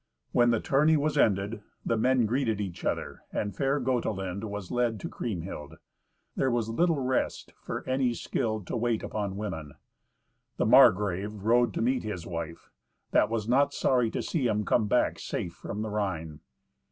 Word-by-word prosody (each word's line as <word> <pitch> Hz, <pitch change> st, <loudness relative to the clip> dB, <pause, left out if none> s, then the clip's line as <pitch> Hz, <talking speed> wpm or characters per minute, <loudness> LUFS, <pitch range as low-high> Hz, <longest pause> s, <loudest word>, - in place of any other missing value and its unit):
When 120 Hz, 0 st, +4 dB
the 115 Hz, -2 st, +3 dB
tourney 150 Hz, +6 st, +3 dB
was 150 Hz, +1 st, 0 dB
ended, 105 Hz, -4 st, +2 dB, 0.2 s
the 115 Hz, -, +1 dB
men 125 Hz, +1 st, +3 dB
greeted 115 Hz, -2 st, 0 dB
each 95 Hz, -4 st, -5 dB
other, -, -, -2 dB
and 105 Hz, -1 st, -2 dB
fair 140 Hz, +1 st, +1 dB
Gotelind 110 Hz, -6 st, -1 dB
was 105 Hz, -3 st, -6 dB
led 120 Hz, -3 st, 0 dB
to -, -, -4 dB
Kriemhild. 85 Hz, -7 st, -5 dB, 0.6 s
There 135 Hz, -, +1 dB
was 120 Hz, -2 st, 0 dB
little 165 Hz, +7 st, +2 dB
rest 130 Hz, -1 st, -1 dB
for -, -, -5 dB
any 130 Hz, -2 st, +1 dB
skilled 110 Hz, -6 st, -2 dB
to -, -, -4 dB
wait 115 Hz, -1 st, 0 dB
upon 100 Hz, -2 st, -3 dB
women. 80 Hz, -9 st, -5 dB, 0.8 s
The -, -, +1 dB
Margrave 100 Hz, +2 st, +5 dB
rode 120 Hz, +2 st, +4 dB
to -, -, 0 dB
meet 125 Hz, +2 st, +1 dB
his 90 Hz, -6 st, -5 dB
wife, 85 Hz, -1 st, -6 dB, 0.4 s
that 105 Hz, -, +4 dB
was 110 Hz, -2 st, -2 dB
not 140 Hz, +4 st, +3 dB
sorry 125 Hz, -3 st, +2 dB
to -, -, -3 dB
see 140 Hz, -7 st, 0 dB
him 105 Hz, -2 st, 0 dB
come 110 Hz, -3 st, +2 dB
back 125 Hz, -, +2 dB
safe 85 Hz, -, -4 dB
from 105 Hz, +4 st, -5 dB
the 110 Hz, -, -3 dB
Rhine. 80 Hz, -7 st, -3 dB
110 Hz, 170 wpm, -28 LUFS, 100-125 Hz, 0.8 s, Margrave